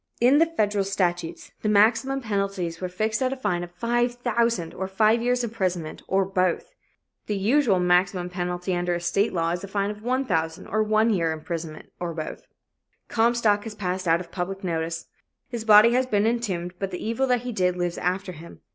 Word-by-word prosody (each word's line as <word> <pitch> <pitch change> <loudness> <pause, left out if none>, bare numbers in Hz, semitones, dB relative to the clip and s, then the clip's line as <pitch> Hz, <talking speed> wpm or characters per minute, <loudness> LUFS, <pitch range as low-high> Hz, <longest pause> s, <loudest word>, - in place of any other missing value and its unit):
In 255 +5 +5
the 330 - +5
federal 210 -10 0
statutes, 175 -4 -2
the 215 - 0
maximum 230 +6 +3
penalties 195 -6 -2
were 185 - -2
fixed 215 +6 -1
at 260 0 +1
a - - -2
fine 175 -9 -1
of 175 0 -11
$5,000 235 -5 0
or 190 - -3
five 215 +4 +3
years 245 +1 +1
imprisonment, 185 -8 -2
or 195 0 +2
both. 185 -2 -1 0.5
The 210 - -1
usual 220 -1 +3
maximum 180 0 +2
penalty 180 0 -3
under 175 0 0
a - - -2
state 195 +5 +1
law 165 -1 0
is 175 +2 -3
a - - -5
fine 200 +1 -1
of 210 - -9
$1,000 210 -10 -1
or 215 +2 +2
one 215 +1 +3
year's 165 -5 +1
imprisonment, 160 -1 -6
or 170 -2 -4
both. 155 -1 -6 0.6
Comstock 225 -3 +2
has 220 -2 -6
passed 185 -2 -3
out 165 +1 +4
of 180 - -9
public 190 +2 -4
notice. 165 -1 -2 0.4
His 235 -3 -5
body 215 +1 +8
has 255 +1 +2
been 210 -3 +2
entombed 195 -7 -1
but 195 - -2
the 180 - -6
evil 230 +4 0
that 250 -2 +2
he 250 0 -4
did 180 -4 +1
lives 175 -1 -2
after 185 +1 -1
him. 170 0 -12
195 Hz, 190 wpm, -25 LUFS, 175-230 Hz, 0.6 s, body